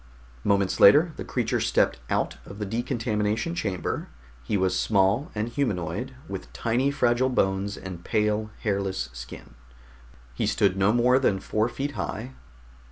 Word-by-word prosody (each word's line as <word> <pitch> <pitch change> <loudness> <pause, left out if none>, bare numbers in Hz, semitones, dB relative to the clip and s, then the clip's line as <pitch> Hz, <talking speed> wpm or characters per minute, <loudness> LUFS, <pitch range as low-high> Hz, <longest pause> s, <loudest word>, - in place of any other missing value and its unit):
Moments 100 -2 +1
later 155 - +7
the - - -6
creature - - -1
stepped - - +2
out - - 0
of 100 - -11
the 105 - -3
decontamination 115 +3 -1
chamber. 100 - -3 0.3
He 65 +12 -1
was 95 -1 +1
small 100 +6 +2
and 105 +2 -1
humanoid, 120 - -2
with - - -7
tiny 120 +4 +1
fragile 125 -2 +2
bones 100 -4 0
and 90 -2 -8
pale, 105 +1 0
hairless 100 - -1
skin. - - -10 0.8
He - - -1
stood 95 -2 +2
no 95 +2 +3
more 125 +2 +4
than 100 -7 +2
four 110 +4 0
feet 140 +4 -3
high. 125 -1 -5
105 Hz, 145 wpm, -26 LUFS, 95-120 Hz, 0.8 s, later